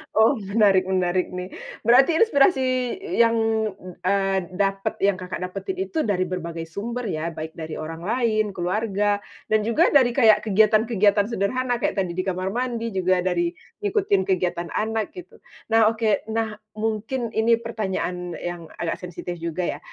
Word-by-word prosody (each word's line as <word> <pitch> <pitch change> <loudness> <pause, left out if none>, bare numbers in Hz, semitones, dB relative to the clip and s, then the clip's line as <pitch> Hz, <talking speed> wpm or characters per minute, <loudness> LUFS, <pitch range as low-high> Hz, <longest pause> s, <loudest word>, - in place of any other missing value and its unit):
Oh 220 +5 +5
menarik 195 -2 +3
menarik 185 -1 +1
nih. 180 +1 -5 0.3
Berarti 265 +7 +6
inspirasi 290 -8 +4 0.6
yang, 230 0 +5 0.7
eee, 195 +1 +1 0.2
dapet 195 0 0
yang 200 -2 +3
Kakak 180 0 -5
dapetin 195 - -4
itu 325 -5 -2
dari 185 -2 +1
berbagai 170 -2 -4
sumber 230 +9 -5
ya, 160 +2 -2
baik 160 +1 -5
dari 160 -2 -6
orang 160 +1 -6
lain, 215 -3 +1
keluarga 205 +2 0 0.3
dan 215 - +5
juga 310 +9 +3
dari 265 -4 +6
kayak 225 -5 +6
kegiatan-kegiatan 215 -1 +3
sederhana, 245 +3 0
kayak 235 - -1
tadi 180 -3 -2
di 185 - -1
kamar 185 0 -2
mandi, 235 +1 -2
juga 185 -2 +1
dari 175 -1 0 0.3
ngikutin 195 0 +2
kegiatan 175 -2 -1
anak 220 0 -1
gitu. 360 -2 -11 0.3
Nah 225 -1 +5
oke, 220 -2 0
nah 220 -1 -2 0.2
mungkin 225 +3 -2
ini 225 +1 +3
pertanyaan 190 -6 -3
yang 175 -1 -5 0.2
agak 170 -1 -1
sensitif 180 0 -6
juga 170 +1 -3 0.2
ya, - - -18
200 Hz, 150 wpm, -23 LUFS, 180-225 Hz, 0.7 s, Berarti